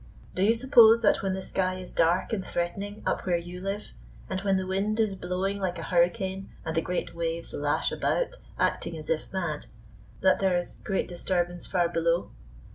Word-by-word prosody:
Do 185 - -2
you 215 +4 +5
suppose 230 -2 +7
that 205 - +4
when 190 -1 -1
the 190 - -5
sky 185 -1 0
is 185 -1 -7
dark 170 +6 +2
and 195 -4 -1
threatening 200 +5 -3
up - - -1
where 175 -1 +3
you 175 +1 -7
live, 195 +2 -4 0.4
and 190 0 -1
when 195 -1 +2
the 190 - -2
wind 200 +4 -1
is 215 -3 +2
blowing 190 +2 -2
like 185 -2 -2
a 165 - -5
hurricane, 190 +3 +1 0.2
and 160 +1 -3
the 165 - +3
great 180 +2 -3
waves 170 0 -3
lash 145 0 0
about, - - 0 0.2
acting 165 - 0
as 155 0 -4
if 160 - -2
mad, 170 -6 -3 0.5
that 190 - +4
there 190 -2 +3
is 175 - -4
great 195 - -1
disturbance 175 0 -1
far 175 -1 +2
below? 170 0 0
185 Hz, 195 wpm, -28 LUFS, 175-195 Hz, 0.5 s, suppose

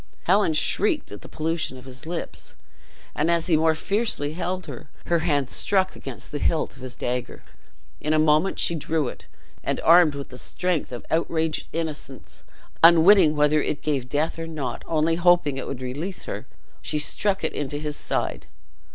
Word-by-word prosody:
Helen 190 -2 +3
shrieked 210 - +3
at - - -9
the - - -12
pollution 155 -4 -3
of 125 - -13
his 130 +4 -8
lips; 170 0 -4 0.6
and 155 +3 0
as 170 -1 +2
he 170 - +3
more 160 0 +3
fiercely 195 -6 0
held 185 +2 -3
her, - - -9 0.2
her 170 -1 +2
hand 145 -5 0
struck 190 -2 +1
against 135 -3 -8
the 145 - -3
hilt 160 +1 0
of - - -15
his 130 -1 -7
dagger. 125 0 -4 0.6
In 150 - -2
a 155 - +3
moment 155 +4 +3
she - - +3
drew 160 -2 -1
it, - - -9 0.4
and - - -1
armed 165 -3 +6
with 140 -1 -7
the 125 - -9
strength 180 -6 -2
of 120 - -7
outraged 160 -1 0
innocence, 140 - -6 0.4
unwitting 170 0 +7
whether 150 +1 +3
it 145 - -3
gave 135 -5 -1
death 155 +4 -1
or 165 - -4
not, 140 -7 -4
only 165 +1 +1
hoping 175 -5 +3
it 135 - -5
would 130 -2 -5
release 150 +10 -5
her, - - -6 0.3
she 150 - -2
struck 195 +6 0
it - - -1
into 145 0 -3
his 150 0 -4
side. - - -3
155 Hz, 180 wpm, -24 LUFS, 145-170 Hz, 0.6 s, unwitting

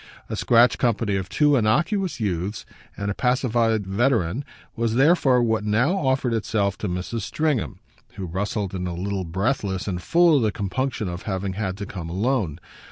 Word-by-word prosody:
A - - -2
scratch 120 0 +4
company 115 -4 +1
of 95 -1 -3
two 150 -1 +3
innocuous 155 - +1
youths 100 -1 -2 0.3
and 100 0 -2
a - - -1
pacified 120 -3 +1
veteran 110 +1 +1 0.3
was 115 -1 0
therefore 135 -3 +4
what 110 -2 +1
now 115 - +2
offered 130 -7 0
itself 105 -3 0
to 105 - -2
Mrs. 90 +6 -3
Stringham, 140 - -1 0.4
who 95 -1 -5
rustled 100 +2 -3
in 90 -1 -3
a 85 - -4
little 95 +1 -3
breathless 95 +2 -1
and 90 -2 -2
full 170 - +4
of - - +2
the 110 -2 +2
compunction 115 +2 -2
of 85 0 -5
having 95 0 -2
had 95 -2 -3
to 100 - -5
come 90 -4 -7
alone. 95 - -1
110 Hz, 170 wpm, -23 LUFS, 95-125 Hz, 0.4 s, scratch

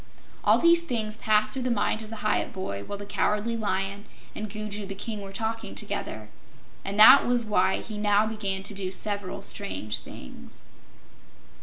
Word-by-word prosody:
All - - +5
these 335 0 +5
things 225 -9 -1
passed 215 -1 +2
through 265 - -2
the 255 - -1
mind 215 -1 0
of 215 - -8
the 220 -1 -8
Hyup 215 - +1
boy 100 - -5
while 200 - -6
the 205 - -8
Cowardly 210 +3 0
Lion 200 -1 -2 0.3
and 215 0 -5
Gugu 210 -1 -5
the 195 - -6
King 210 +1 -4
were 195 -1 -8
talking 225 +3 -3
together, 110 - -4 0.5
and 200 +2 -4
that 255 +6 +10
was 240 -1 +1
why 190 -3 +1
he 215 -2 -7
now 210 0 +3
began 200 -3 -2
to 205 - -5
do 190 -2 -3
several 200 0 -2
strange 150 - -3
things. 60 - -11
210 Hz, 175 wpm, -26 LUFS, 195-220 Hz, 0.5 s, that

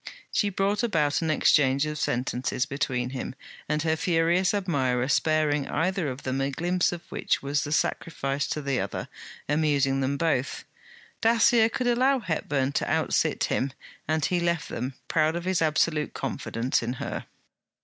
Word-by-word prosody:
She 205 - +1
brought 200 +2 0
about 160 -11 +1
an 165 - -1
exchange 140 -2 +3
of 150 0 -3
sentences 125 +1 -1
between 130 -3 -2
him 130 0 -5 0.3
and 150 0 0
her 160 -1 +2
furious 170 +2 +2
admirer, 135 -11 0
sparing 150 0 +2
either 185 0 0
of 130 +2 -7
them 130 +1 -1
a 135 - 0
glimpse 175 +6 0
of 175 -1 -6
which - - -1
was 140 +1 0
the 145 - -5
sacrifice 140 -3 -1
to 150 - -3
the 140 -2 0
other, - - -4 0.4
amusing 145 -3 +2
them 135 +1 0
both. 140 -4 0 0.6
Dacier 230 0 +5
could 255 +1 -2
allow 255 +3 +3
Mr. 245 - -8
Hepburn 145 -6 -1
to - - -1
outsit - - +1
him; 135 0 0 0.3
and 155 -1 +1
he 180 - +1
left 170 -2 -1
them, 125 +3 -4
proud 155 0 +2
of 175 +1 -4
his 185 -2 +1
absolute 155 -1 +1
confidence 115 +3 -1
in 120 +1 -2
her. 130 - -5
150 Hz, 165 wpm, -26 LUFS, 135-175 Hz, 0.6 s, Dacier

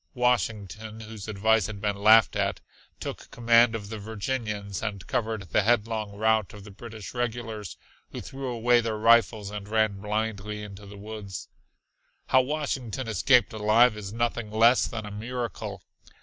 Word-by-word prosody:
Washington, 110 -3 -1
whose 110 -2 -9
advice 110 0 +2
had 105 -2 -7
been 105 0 -1
laughed 110 +2 +6
at, - - 0 0.4
took - - -7
command 115 -1 +4
of 100 -2 -6
the 110 -1 -6
Virginians 105 -2 -4
and 100 -4 -4
covered 115 -4 -2
the - - +4
headlong 110 -1 0
rout 110 -1 +1
of 100 - -11
the 105 - -11
British 110 -1 -9
regulars, 115 -3 -4 0.3
who - - -6
threw 135 0 -6
away 120 0 +3
their 110 -2 -2
rifles 110 -2 +3
and 105 -1 -6
ran 110 -3 +1
blindly 105 0 -3
into 100 0 -10
the 100 +1 -11
woods. 105 -2 -7 0.8
How 130 - +6
Washington 130 -4 -3
escaped 115 +2 +3
alive 110 +2 +4
is 100 -2 -7
nothing 115 -1 -2
less 115 +3 +4
than 110 -2 -5
a 105 - -7
miracle. 110 -3 -5
110 Hz, 155 wpm, -27 LUFS, 105-115 Hz, 0.8 s, laughed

